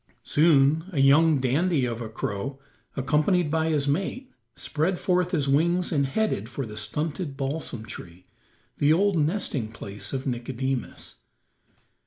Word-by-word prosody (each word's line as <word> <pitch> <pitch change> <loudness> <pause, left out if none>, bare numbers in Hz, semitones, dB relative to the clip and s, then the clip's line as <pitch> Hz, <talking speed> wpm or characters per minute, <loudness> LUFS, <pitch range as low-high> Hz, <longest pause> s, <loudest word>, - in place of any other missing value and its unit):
Soon 150 0 +4
a 155 - -2
young 145 +3 +5
dandy 140 +3 +1
of 120 -1 -3
a 110 - -5
crow, 110 +5 -4 0.4
accompanied 150 +5 +2
by 160 0 +1
his 145 -3 +1
mate, 195 - -2 0.2
spread 170 +4 -1
forth 180 -1 +1
his 150 -6 0
wings 170 +6 +2
and 140 -4 +2
headed 135 - -1
for 130 +1 -4
the 105 -1 -9
stunted 145 - -3
balsam 135 -5 -3
tree, 90 -4 -10 0.5
the 145 +1 +4
old 195 +4 +3
nesting 150 - -1
place 100 -3 -6
of 135 -1 -3
Nicodemus. 130 +1 -4
145 Hz, 140 wpm, -26 LUFS, 125-165 Hz, 0.5 s, young